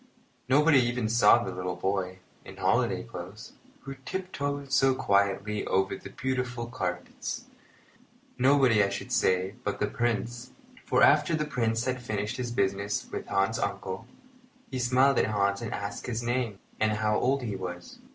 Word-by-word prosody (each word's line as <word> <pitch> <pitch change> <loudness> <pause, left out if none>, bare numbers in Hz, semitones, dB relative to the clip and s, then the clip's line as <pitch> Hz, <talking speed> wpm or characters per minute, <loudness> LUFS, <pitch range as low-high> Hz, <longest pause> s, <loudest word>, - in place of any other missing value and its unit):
Nobody 145 +1 +6
even 120 -2 0
saw 115 +1 +5
the 95 - -4
little 90 0 -4
boy, 95 0 -2 0.2
in - - -12
holiday - - +1
clothes, 95 +5 -9 0.3
who 135 - -7
tiptoed 145 -6 -4
so 135 -1 +4
quietly 100 0 +1
over 95 0 +1
the - - -10
beautiful 125 -2 -2
carpets. 90 -7 -4 0.9
Nobody, 130 -5 +4
I 100 - +1
should - - -5
say, 95 +1 +2
but - - -2
the - - +2
Prince; 120 +1 -2 0.3
for - - +3
after 155 +2 +5
the 155 -1 -1
Prince 115 -4 0
had 130 -1 -2
finished 105 -3 -3
his 125 -1 -3
business 100 -2 -1
with - - -5
Hans's 100 +4 +1
uncle, 100 +2 -4 0.6
he 130 - -2
smiled 130 +2 +4
at - - +2
Hans 100 0 +1
and 115 - -4
asked 100 0 -5
his 120 -1 -2
name 120 -3 -1 0.2
and 110 0 +2
how 105 0 +1
old 135 +1 +1
he 105 -4 -3
was. 90 -2 -7
115 Hz, 160 wpm, -28 LUFS, 100-130 Hz, 0.9 s, Nobody